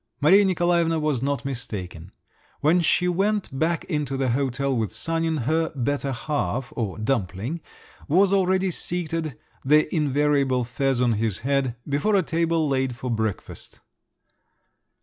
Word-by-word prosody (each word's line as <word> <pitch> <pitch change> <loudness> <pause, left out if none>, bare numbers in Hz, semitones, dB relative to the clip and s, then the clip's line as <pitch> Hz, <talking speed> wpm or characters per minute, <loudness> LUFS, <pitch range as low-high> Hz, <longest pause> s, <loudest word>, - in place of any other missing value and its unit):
Maria 185 +8 +6
Nikolaevna 175 -3 +2
was 150 -5 0
not 140 +1 -2
mistaken. 100 -10 -6 0.5
When 160 +5 +4
she 180 +2 +2
went 195 -2 0
back 165 +1 +1
into 150 -5 -2
the 135 -1 0
hotel 135 +1 0
with 110 -4 -1
Sanin, 165 +7 -1
her 160 +5 +1
"better 140 +1 -1
half" 135 -1 -2
or 110 -6 -3
"dumpling" 110 - -2 0.5
was 185 +6 +4
already 190 -1 +2
seated, 165 -5 -3 0.3
the 150 +3 +3
invariable 145 -3 +2
fez 125 +2 -1
on 120 -2 +3
his 110 -2 -1
head, 135 -2 0
before 145 +9 +1
a 190 - +3
table 165 -1 0
laid 130 -2 0
for 125 +1 -4
breakfast. 110 -3 -4
140 Hz, 135 wpm, -24 LUFS, 125-165 Hz, 0.5 s, Maria